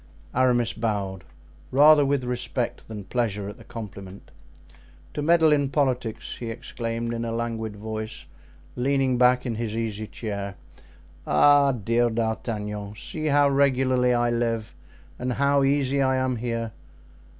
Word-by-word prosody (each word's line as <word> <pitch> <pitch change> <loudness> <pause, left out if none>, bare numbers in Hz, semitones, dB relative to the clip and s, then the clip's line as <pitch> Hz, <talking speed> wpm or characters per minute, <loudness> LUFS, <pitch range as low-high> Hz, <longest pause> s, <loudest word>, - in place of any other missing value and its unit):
Aramis 120 -3 +2
bowed, 100 -4 -2 0.5
rather 145 +2 +7
with 140 -1 +1
respect 125 0 -3
than 105 -2 -7
pleasure 105 -2 -2
at 105 - -9
the - - -12
compliment. 100 -3 -9 0.8
"To 150 - -3
meddle 160 0 +4
in 140 -2 +1
politics," 130 -6 -1
he 115 - -5
exclaimed, 115 0 -4
in 115 0 -3
a 115 - -3
languid 115 -2 -3
voice, 110 +1 -6 0.5
leaning 130 -1 +1
back 125 +1 +4
in 120 - -1
his 110 -1 -3
easy 110 -2 -3
chair. 100 -3 -5 0.7
"Ah! 140 - +5
dear 120 0 +1
D'Artagnan! 110 -2 -3
see 155 +7 -4
how 145 -1 +4
regularly 130 -2 +3
I 120 0 +2
live 115 -2 -1 0.5
and 125 0 -1
how 140 +2 +2
easy 140 0 +2
I 130 -1 +2
am 130 -1 0
here. 115 -1 -3
120 Hz, 140 wpm, -25 LUFS, 110-130 Hz, 0.8 s, rather